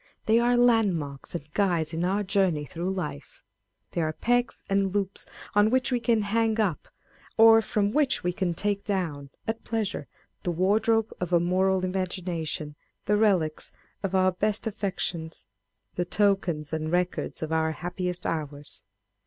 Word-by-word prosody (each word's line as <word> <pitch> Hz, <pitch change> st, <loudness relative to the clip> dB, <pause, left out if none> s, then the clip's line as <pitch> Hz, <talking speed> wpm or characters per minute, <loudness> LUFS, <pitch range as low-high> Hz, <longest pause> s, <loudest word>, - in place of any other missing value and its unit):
They 225 Hz, +1 st, +4 dB
are 240 Hz, +1 st, +3 dB
landmarks 195 Hz, -, +1 dB
and 150 Hz, -2 st, -7 dB
guides 175 Hz, -6 st, +1 dB
in 165 Hz, +1 st, -1 dB
our 195 Hz, +3 st, +1 dB
journey 185 Hz, -6 st, +1 dB
through 175 Hz, +6 st, -3 dB
life. 180 Hz, -, -6 dB, 0.5 s
They 170 Hz, -, -1 dB
are 155 Hz, -1 st, 0 dB
pegs 245 Hz, +6 st, 0 dB
and 195 Hz, -1 st, +1 dB
loops 200 Hz, -1 st, -2 dB, 0.3 s
on 205 Hz, +1 st, +5 dB
which 260 Hz, +2 st, +1 dB
we 245 Hz, -, +2 dB
can 230 Hz, -2 st, +2 dB
hang 225 Hz, +1 st, +1 dB
up, 190 Hz, -9 st, 0 dB, 0.5 s
or 225 Hz, 0 st, +8 dB
from 205 Hz, -1 st, 0 dB
which 280 Hz, 0 st, +1 dB
we 180 Hz, 0 st, 0 dB
can 175 Hz, -2 st, -1 dB
take 205 Hz, +2 st, -1 dB
down, 165 Hz, -9 st, -2 dB, 0.2 s
at 225 Hz, 0 st, -3 dB
pleasure, 220 Hz, -3 st, -2 dB, 0.3 s
the 180 Hz, -, -2 dB
wardrobe 215 Hz, +6 st, +2 dB
of 180 Hz, -1 st, -3 dB
a 175 Hz, -, +5 dB
moral 185 Hz, +2 st, +2 dB
imagination, 175 Hz, -5 st, -3 dB, 0.3 s
the 210 Hz, -, +3 dB
relics 190 Hz, -8 st, +1 dB, 0.3 s
of 195 Hz, -1 st, -2 dB
our 185 Hz, 0 st, +4 dB
best 210 Hz, +4 st, -1 dB
affections, 180 Hz, -, -3 dB, 0.5 s
the 175 Hz, -, -1 dB
tokens 175 Hz, -6 st, +1 dB
and 155 Hz, 0 st, -2 dB
records 180 Hz, -2 st, -1 dB
of 160 Hz, -, -4 dB
our 160 Hz, 0 st, +1 dB
happiest 180 Hz, +2 st, -4 dB
hours. 145 Hz, -10 st, -5 dB
185 Hz, 155 wpm, -27 LUFS, 165-210 Hz, 0.5 s, or